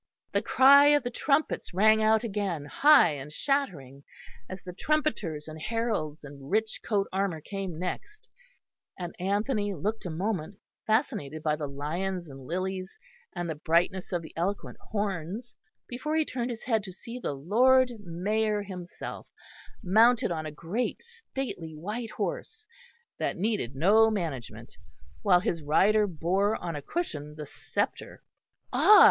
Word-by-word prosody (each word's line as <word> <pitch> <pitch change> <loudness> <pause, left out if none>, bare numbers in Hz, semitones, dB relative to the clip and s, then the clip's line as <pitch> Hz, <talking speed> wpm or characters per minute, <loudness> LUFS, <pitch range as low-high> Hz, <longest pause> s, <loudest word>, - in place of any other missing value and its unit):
The - - +1
cry 280 +2 +7
of 290 -2 +5
the 245 - -3
trumpets 275 - 0
rang 220 +3 +5
out 220 +1 +4
again 195 -9 -2
high 290 - +6
and 145 0 -7
shattering, 155 - -2 0.5
as 185 - -7
the 180 - -7
trumpeters 200 - -1
and 155 0 -8
heralds 215 -9 -2
in 140 -1 -11
rich 220 +3 0
coat 200 -3 +1
armour 190 -4 0
came 190 0 -5
next; 185 - -5 0.7
and 175 -2 -5
Anthony 205 +2 0
looked 205 +5 -3
a - - -4
moment, 185 +1 -3 0.3
fascinated 215 - 0
by 150 -1 +2
the 150 -1 -4
lions 170 +6 -3
and 135 -1 -11
lilies, 185 +2 -3 0.4
and 175 - -3
the 160 - -2
brightness 170 +5 0
of 175 -2 -1
the 160 - -11
eloquent 190 +5 -3
horns, 205 +2 -3 0.3
before 300 +6 -3
he 315 -1 +3
turned 250 -3 -3
his 235 -2 -6
head 225 -4 +1
to 190 - -7
see 230 +6 -8
the 195 - -2
Lord 245 - +4
Mayor 205 +4 0
himself, 180 -3 -8 0.6
mounted 225 +4 +4
on 155 -2 -3
a - - -5
great 170 +11 -3
stately 270 - -6
white 210 +9 -4
horse, 445 - -4 0.5
that - - -1
needed 195 - -1
no 210 +9 +5
management, 165 - -5 0.4
while 180 - +5
his 175 -5 -1
rider 205 +8 +4
bore 190 +5 +1
on 170 -2 -4
a 145 - -4
cushion 150 - -4
the 150 -1 -6
sceptre. - - -4 0.5
Ah! 425 - +8
195 Hz, 150 wpm, -28 LUFS, 160-225 Hz, 0.7 s, Ah